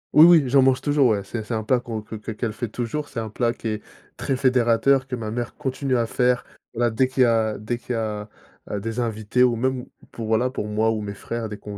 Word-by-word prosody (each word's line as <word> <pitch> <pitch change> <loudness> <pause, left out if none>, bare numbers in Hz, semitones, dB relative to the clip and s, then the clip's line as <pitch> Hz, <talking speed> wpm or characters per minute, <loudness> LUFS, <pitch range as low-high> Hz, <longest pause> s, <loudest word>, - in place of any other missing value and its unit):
Oui, 155 - +9
oui, 170 -3 +7
j'en 135 +1 +5
mange 130 0 +3
toujours, 145 -2 +3
ouais, 105 -4 +1
c'est 110 +3 -5
c'est 110 - -5
un 110 -1 -1
plat 125 +4 +2
qu'on 115 -3 -5
que 105 +1 -9
qu'e 110 +1 -6
qu'elle 110 +1 -3
fait 120 +3 -4
toujours, 120 +7 -4
c'est 115 - -4
un 110 - -5
plat 115 +2 0
qui 115 - -5
est 105 -1 -3 0.4
très 135 - -1
fédérateur, 130 +1 +3
que 130 - -3
ma 110 -3 -5
mère 120 +1 -4
continue 135 -2 -1
à 120 -1 +2
faire. 125 +2 +1 0.3
Voilà, 120 0 +1
dès 130 +4 +2
qu'il 130 0 +2
y - - +6
a 110 -2 +1
dès 110 +3 -3
qu'il 125 - -5
y - - -1
a, 105 -2 -3 0.4
heu, 105 - -2
des 115 +3 -3
invités 110 0 -1
ou 125 -2 +5
même 130 +1 -1 0.3
pour, 115 -2 -6
voilà, 115 +3 +2
pour 115 -5 -4
moi 110 +1 +1
ou 110 - -1
mes 105 -1 -5
frères, 115 +3 -5
dès 105 - -6
qu'on 105 0 -8
120 Hz, 265 wpm, -23 LUFS, 110-130 Hz, 0.4 s, Oui